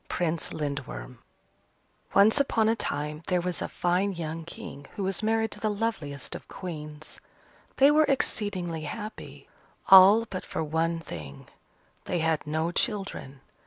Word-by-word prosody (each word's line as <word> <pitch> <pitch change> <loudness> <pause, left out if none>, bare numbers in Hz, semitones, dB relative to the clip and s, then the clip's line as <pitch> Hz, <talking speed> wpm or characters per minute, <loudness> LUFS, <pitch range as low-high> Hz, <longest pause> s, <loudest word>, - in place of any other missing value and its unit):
PRINCE 170 -2 -1
LINDWORM 140 - -5 1.0
Once 215 +7 +6
upon 230 -6 +2
a 225 - +3
time, 150 -6 -3
there 180 -1 +2
was 180 0 -2
a - - -1
fine 185 +3 0
young 165 -1 -5
King 170 -7 -9
who 200 - -3
was 190 0 -1
married 225 0 +1
to - - -7
the 215 - 0
loveliest 200 - -3
of - - -8
Queens. 155 -4 -8 0.6
They 275 +2 +7
were 310 +1 +5
exceedingly 195 - -1
happy, 215 +8 -7 0.4
all 195 +4 +9
but 185 -4 -5
for 160 - -3
one 165 +2 0
thing 70 - -9 0.6
they 180 - -1
had 160 -2 0
no 160 +2 0
children. 190 - -3
175 Hz, 145 wpm, -27 LUFS, 155-210 Hz, 1.0 s, all